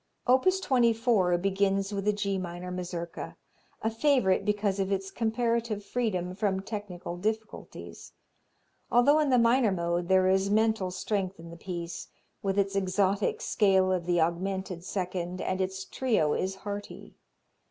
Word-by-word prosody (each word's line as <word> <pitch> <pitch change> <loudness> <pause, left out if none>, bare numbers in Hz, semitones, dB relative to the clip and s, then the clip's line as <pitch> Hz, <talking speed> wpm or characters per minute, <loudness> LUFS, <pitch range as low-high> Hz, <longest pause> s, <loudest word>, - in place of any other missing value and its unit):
Opus 265 +10 +4
24 230 - +2
begins 195 +1 0
with 200 0 -3
the 210 - +4
G 200 -2 -1
minor 180 0 -6
Mazurka, 175 -2 -5 0.5
a 225 - +1
favorite 225 -6 +2
because 205 -1 0
of 195 0 -1
its 195 0 -2
comparative 230 -2 -1
freedom 190 -7 -1
from 190 -1 -1
technical 195 -4 -6
difficulties. 220 +3 -5 0.8
Although 280 +6 +5
in 300 -2 +2
the 255 - +4
minor 235 -1 +4
mode 170 -1 -1
there 190 0 +4
is 190 +1 +2
mental 220 -2 +2
strength 190 0 -2
in 165 0 -10
the - - -9
piece, 170 -1 -6 0.3
with 195 0 -1
its 200 0 +1
exotic 195 +1 +1
scale 190 -3 +3
of 180 -2 -1
the 175 -1 +2
augmented 180 +2 -1
second, 180 -1 -3
and 185 0 -1
its 190 0 -3
trio 215 - +1
is 190 +1 -1
hearty. 205 +1 -7
195 Hz, 145 wpm, -28 LUFS, 185-220 Hz, 0.8 s, Although